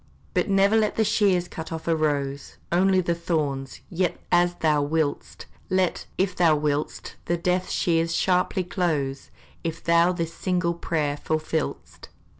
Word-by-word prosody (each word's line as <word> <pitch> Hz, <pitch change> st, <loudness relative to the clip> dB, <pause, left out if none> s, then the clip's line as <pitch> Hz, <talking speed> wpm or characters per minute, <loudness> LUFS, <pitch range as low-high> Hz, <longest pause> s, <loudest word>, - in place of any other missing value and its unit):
But -, -, +1 dB
never 195 Hz, +2 st, +4 dB
let 215 Hz, -1 st, +2 dB
the 220 Hz, -, +2 dB
shears 195 Hz, -4 st, +2 dB
cut 160 Hz, -1 st, -7 dB
off 160 Hz, 0 st, -6 dB
a 165 Hz, -, +3 dB
rose 140 Hz, -3 st, -2 dB
Only 185 Hz, +2 st, +4 dB
the 170 Hz, -1 st, 0 dB
thorns, 150 Hz, -6 st, -2 dB
yet 180 Hz, 0 st, 0 dB
as 175 Hz, 0 st, +3 dB
thou 155 Hz, -3 st, +2 dB
will'st! 150 Hz, 0 st, -2 dB, 0.2 s
Let, 185 Hz, -1 st, 0 dB
if 185 Hz, -1 st, 0 dB
thou 165 Hz, -3 st, +4 dB
will'st, 150 Hz, 0 st, -2 dB
the 175 Hz, -, 0 dB
death 180 Hz, +2 st, 0 dB
shears, 165 Hz, -1 st, +1 dB
sharply 185 Hz, 0 st, +1 dB
close, 155 Hz, -7 st, -2 dB, 0.3 s
If 165 Hz, -1 st, -4 dB
thou 170 Hz, +1 st, +4 dB
this 170 Hz, -2 st, -3 dB
single 180 Hz, -2 st, 0 dB
prayer 155 Hz, -4 st, -1 dB
fulfill'st! 155 Hz, 0 st, -3 dB
170 Hz, 150 wpm, -25 LUFS, 155-180 Hz, 0.3 s, never